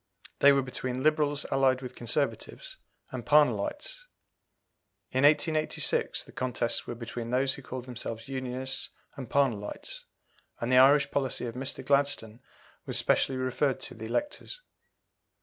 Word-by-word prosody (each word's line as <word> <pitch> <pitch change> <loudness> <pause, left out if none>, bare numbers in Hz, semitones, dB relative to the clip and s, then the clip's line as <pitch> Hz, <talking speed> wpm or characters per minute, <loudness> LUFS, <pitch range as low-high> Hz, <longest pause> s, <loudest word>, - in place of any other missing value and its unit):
They 140 - +7
were 140 -1 +3
between 130 0 -3
Liberals 150 -1 +2
allied 135 -1 +2
with 125 - -7
Conservatives, 150 - -3 0.3
and 130 -3 -5
Parnellites. 150 - +1 1.1
In 130 +1 +1
1886 155 +1 +2
the - - -14
contests 120 -2 -1
were 120 - -4
between 115 0 -6
those 130 +2 +2
who - - -8
called 130 -1 -7
themselves 115 -2 -5
Unionists 130 0 -3 0.3
and 130 -4 -7
Parnellites, 120 -8 -1 0.5
and 120 +2 -2
the 125 - +7
Irish 140 +2 +6
policy 135 -3 0
of 115 - -5
Mr. 135 +3 -4
Gladstone 140 -6 +1 0.5
was - - +1
specially 130 - +2
referred 130 +1 0
to - - -4
the 110 -1 -8
electors. 295 - -3
130 Hz, 135 wpm, -29 LUFS, 125-145 Hz, 1.1 s, They